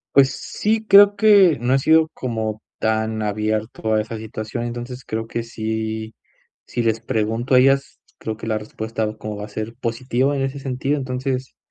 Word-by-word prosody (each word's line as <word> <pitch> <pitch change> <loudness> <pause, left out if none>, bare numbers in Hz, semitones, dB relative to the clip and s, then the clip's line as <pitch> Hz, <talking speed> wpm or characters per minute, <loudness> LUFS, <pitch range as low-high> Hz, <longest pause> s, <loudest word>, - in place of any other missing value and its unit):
Pues 135 -1 +6
sí. 220 +1 -1
Creo 200 0 +8
que 200 -6 +6
no 125 +2 +1
he 135 - +4
sido, 160 +3 +4
como 110 -3 -3 0.2
tan 110 0 0
abierto 110 +1 -1
a 110 - +3
esa 115 +2 -6
situación. 110 +2 -5
Entonces, 120 +2 -6
creo 110 -1 -4
que 115 0 -3
sí 110 -1 -4 0.5
si 120 - -2
les 115 0 +1
pregunto 115 +3 -1
a 125 - +8
ellas, 135 +1 +2 0.2
creo 110 -1 -5
que 110 - -7
la 110 - 0
respuesta, 110 0 -4
como 110 -1 -5
va 105 - -6
a 105 - -13
ser 110 +2 -5
positiva, 125 +3 0
en 135 - 0
ese 135 +1 -3
sentido. 135 +2 -1
Entonces, 130 0 -3
115 Hz, 180 wpm, -21 LUFS, 110-135 Hz, 0.5 s, Creo